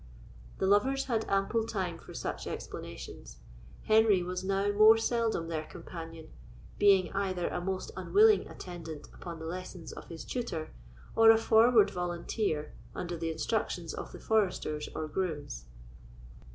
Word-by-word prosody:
The - - 0
lovers 260 +8 +3
had 225 -4 -1
ample 195 +3 +1
time 190 -7 -3
for - - -12
such - - -4
explanations. - - -7 0.5
Henry 215 -4 +4
was 180 +1 -4
now 195 +1 +1
more 215 +2 +7
seldom 225 -7 0
their 155 -2 -3
companion, 165 -2 -9 0.5
being 195 -3 +5
either 190 -3 -1
a 180 - -3
most 190 +1 -3
unwilling 415 - +4
attendant 165 -4 -8
upon 170 -2 -8
the 160 - -8
lessons 180 0 -6
of - - -10
his 165 -2 -8
tutor, 200 -11 -4 0.4
or 225 0 +7
a 225 - +8
forward 225 0 +5
volunteer 175 -2 -2 0.2
under 175 -1 -3
the 165 0 -3
instructions 170 0 -2
of - - -6
the - - -10
foresters 185 -8 0
or 155 0 -3
grooms. 150 - -3
185 Hz, 140 wpm, -31 LUFS, 165-220 Hz, 0.5 s, a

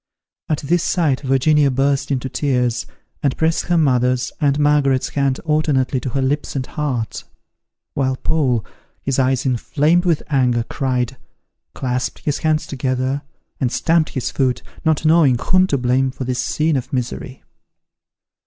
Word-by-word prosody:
At 155 - 0
this 170 +4 +1
sight 155 -8 +1
Virginia 140 +2 +3
burst 135 +1 0
into 135 -2 -1
tears, 125 -4 0 0.3
and 140 -2 0
pressed 160 0 +1
her 175 - +1
mother's 125 -4 +2
and 140 -1 +2
Margaret's 145 -3 +2
hand 140 -2 0
alternately 150 -4 +1
to 130 - -4
her 135 +2 -1
lips 145 +3 -1
and 130 -2 -2
heart; 125 -9 -3 0.7
while 130 -1 0
Paul, 130 - 0 0.4
his 135 0 0
eyes 130 0 +1
inflamed 150 +7 +1
with 170 -4 +1
anger, 125 -5 +2
cried, 125 0 -2 0.6
clasped 125 -1 -3
his 145 - 0
hands 155 -1 +1
together, 130 +1 -2 0.4
and 125 -3 0
stamped 165 -1 +2
his 130 - -2
foot, 130 -2 0 0.2
not 160 -1 +1
knowing 155 -6 +5
whom 185 +8 +2
to 140 - +1
blame 130 +1 +1
for 130 0 -6
this 125 0 -2
scene 155 -1 +1
of 125 - -5
misery. 130 0 -4
135 Hz, 150 wpm, -19 LUFS, 130-150 Hz, 0.7 s, knowing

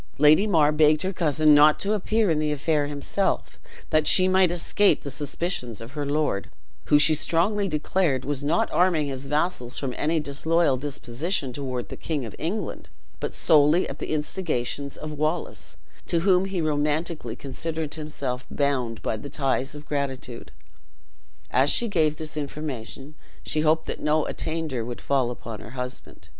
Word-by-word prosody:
Lady 150 +8 +5
Mar 155 -7 +4
begged 155 +1 +3
her 190 +1 -2
cousin 155 -3 +3
not 150 +1 +6
to 205 +2 0
appear 215 -1 +1
in 155 - +1
the 155 -1 0
affair 150 0 0
himself, 145 +7 -1 0.3
that 155 -1 +3
she 185 -1 +7
might 185 -1 +4
escape 175 +4 +2
the 140 - -3
suspicions 140 - -3
of 115 +3 -9
her 145 -1 -4
lord; 145 -9 -1 0.4
who, 145 - +5
she 155 +2 +6
strongly 195 +7 +1
declared, 150 -4 0
was 145 0 -2
not 155 +4 +1
arming 175 -4 +2
his 135 -1 -5
vassals 150 -4 -1
from 130 -3 -2
any 160 +2 0
disloyal 150 +1 +1
disposition 140 +2 -3
toward 130 -3 -4
the - - -6
king 150 -6 -3
of 110 - -8
England, 180 +4 -4 0.3
but - - -3
solely 155 +3 +4
at 140 - -8
the - - -5
instigations 150 -4 -2
of 155 - -6
Wallace, 155 +3 -3 0.3
to 170 - +1
whom 185 0 +3
he 190 -3 -2
romantically 150 -4 -1
considered 155 +3 -5
himself 140 -5 -4
bound 130 -6 -1
by - - -1
the 140 +6 -8
ties 135 0 -1
of 150 +1 -10
gratitude. 135 -4 -4 1.0
As 135 +3 +3
she 235 - +4
gave 155 -7 +1
this 155 0 -7
information, 145 -2 -6 0.3
she 155 - -1
hoped 160 +1 +2
that - - -5
no 150 0 +1
attainder 160 -7 -2
would 120 +1 -6
fall 135 -3 +1
upon 115 -3 -7
her - - -10
husband. 125 -9 -7
150 Hz, 165 wpm, -25 LUFS, 135-165 Hz, 1.0 s, she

